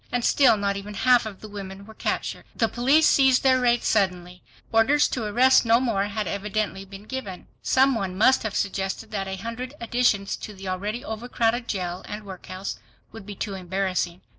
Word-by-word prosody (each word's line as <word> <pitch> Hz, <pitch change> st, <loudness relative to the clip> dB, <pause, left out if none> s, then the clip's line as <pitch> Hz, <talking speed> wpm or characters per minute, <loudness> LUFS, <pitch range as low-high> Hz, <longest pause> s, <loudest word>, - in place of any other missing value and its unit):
And 245 Hz, -1 st, 0 dB
still 260 Hz, -6 st, +5 dB
not 200 Hz, -1 st, -1 dB
even 205 Hz, +1 st, -7 dB
half 250 Hz, +1 st, +4 dB, 0.2 s
the 215 Hz, -, -8 dB
women 200 Hz, -1 st, -8 dB
were 220 Hz, -, -13 dB
captured. -, -, -3 dB
The 225 Hz, -, +2 dB
police 270 Hz, +8 st, +3 dB
ceased 265 Hz, -2 st, +4 dB
their 260 Hz, -1 st, +4 dB
raids 240 Hz, -1 st, +2 dB
suddenly. 180 Hz, -3 st, 0 dB, 0.3 s
Orders 265 Hz, +7 st, +4 dB
to 235 Hz, -4 st, -3 dB
arrest 250 Hz, +5 st, +4 dB
no 230 Hz, 0 st, +4 dB
more 225 Hz, -6 st, 0 dB
had 210 Hz, +1 st, -3 dB
evidently 200 Hz, -1 st, -3 dB
been 195 Hz, +1 st, -11 dB
given. 215 Hz, -6 st, -6 dB, 0.2 s
Some 265 Hz, +1 st, +3 dB
one 190 Hz, -5 st, -3 dB
must 260 Hz, +6 st, +4 dB
have 220 Hz, -3 st, -4 dB
suggested 195 Hz, +2 st, -2 dB
that 195 Hz, -2 st, -3 dB
a 190 Hz, -, -4 dB
hundred 230 Hz, +7 st, -6 dB
additions 235 Hz, -4 st, +1 dB
to 210 Hz, -, -9 dB
the 190 Hz, 0 st, -9 dB
already 205 Hz, +6 st, -3 dB
overcrowded 235 Hz, +1 st, -1 dB
jail 180 Hz, -2 st, -3 dB
and 210 Hz, 0 st, -7 dB
workhouse 185 Hz, 0 st, -7 dB, 0.3 s
would 215 Hz, -3 st, -11 dB
be 205 Hz, -, -7 dB
too 200 Hz, +1 st, -4 dB
embarrassing. 185 Hz, -1 st, -2 dB
210 Hz, 185 wpm, -24 LUFS, 195-240 Hz, 0.3 s, still